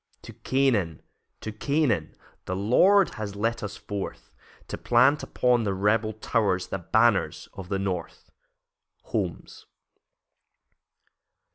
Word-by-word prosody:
To - - -10
Canaan, 115 - 0 0.4
to 110 - -5
Canaan, 140 +2 0 0.3
The 95 - -3
Lord 180 - +4
has 100 -2 -5
led 115 +3 -1
us 100 -1 -6
forth, 100 -2 -6 0.4
To - - -3
plant 130 +5 +3
upon 125 -2 +1
the 100 -2 -1
rebel 105 +3 +1
towers 100 -3 0
The 95 - -3
banners 110 +3 +1
of 95 -2 -9
the 100 - 0
North. 95 -3 -5 0.7
Holmes. - - -5
105 Hz, 115 wpm, -26 LUFS, 95-120 Hz, 0.7 s, Lord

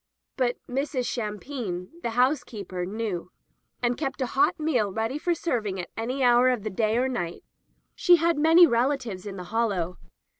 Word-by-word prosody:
But 245 -2 0
Mrs. 265 0 -2
Shampine, 210 -4 -4
the 235 - -2
housekeeper, 225 -9 0
knew, 200 -4 -3 0.5
and 240 0 +1
kept 275 -3 -3
a 260 - +1
hot 295 +7 +2
meal 250 -10 +1
ready 225 +7 -2
for 345 +2 0
serving 220 - -2
at 175 - -6
any 250 +4 -2
hour 245 +1 +5
of 245 -5 0
the 215 - -3
day 215 +3 +1
or 255 +2 +2
night. 175 -10 -4 0.5
She 355 - +5
had 335 -2 +1
many 325 +3 +7
relatives 235 - 0
in 195 - -6
the 180 - -6
Hollow. 195 -6 0
240 Hz, 165 wpm, -26 LUFS, 210-275 Hz, 0.5 s, many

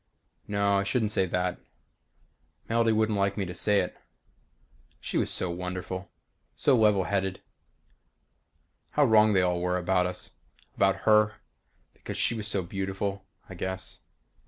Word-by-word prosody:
No 100 -1 +2
I - - 0
shouldn't 110 +1 0
say 95 -2 +1
that. 90 0 -1 1.1
Melody 115 0 +2
wouldn't 110 -1 +1
like 100 +1 0
me 100 - -1
to 90 - -6
say 100 +3 +3
it. 90 - -5 1.0
She - - -6
was - - 0
so 90 - -1
wonderful 90 +1 -5 0.5
so 140 - +3
level 105 -4 +4
headed. 95 -1 -1 1.5
How 150 - +4
wrong 110 -3 +5
they 95 -2 +3
all 90 -1 0
were 90 0 0
about 90 0 +1
us. 90 0 -7 0.4
About 95 0 +2
her. 105 -1 +4 0.6
Because - - -7
she - - +2
was 110 -2 -3
so 100 -3 -1
beautiful, 95 +1 -4 0.2
I - - -9
guess. 95 0 -5
95 Hz, 145 wpm, -28 LUFS, 90-105 Hz, 1.5 s, wrong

